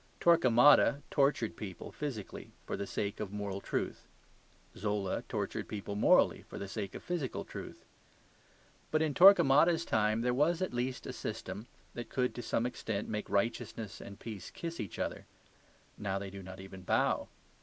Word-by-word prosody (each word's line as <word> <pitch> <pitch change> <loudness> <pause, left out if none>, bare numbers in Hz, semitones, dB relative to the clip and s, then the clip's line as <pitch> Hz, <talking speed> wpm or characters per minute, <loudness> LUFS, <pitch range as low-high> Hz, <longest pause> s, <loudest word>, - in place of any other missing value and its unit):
Torquemada 140 -2 +6
tortured 135 -5 +2
people 95 -5 -7
physically 130 -10 -6
for - - -3
the 100 - -4
sake 100 +1 -3
of 105 -3 -4
moral 100 -1 -4
truth. - - -3 0.7
Zola 105 -1 -1
tortured - - -3
people 100 -1 -5
morally 105 - +4
for - - -10
the 100 - -5
sake 100 0 -5
of - - -7
physical 170 -7 -3
truth. - - -9 1.0
But 155 0 +2
in 155 -2 0
Torquemada's 170 -2 +7
time 110 0 +2
there 125 +1 +1
was 155 +6 +2
at 185 -6 -2
least 125 +1 -2
a - - -5
system 110 +4 -5 0.3
that 120 - -6
could 125 -2 0
to 120 - -5
some 115 0 0
extent 110 -4 -3
make 105 -1 -3
righteousness 100 -2 -2
and 100 0 -10
peace 110 -4 -7
kiss 170 0 -6
each 100 -5 -5
other. - - -3 0.7
Now 100 -2 -1
they 100 -1 -5
do 100 0 -8
not 95 0 -9
even 95 0 -10
bow. 90 - +1
110 Hz, 165 wpm, -33 LUFS, 100-140 Hz, 1.0 s, Torquemada's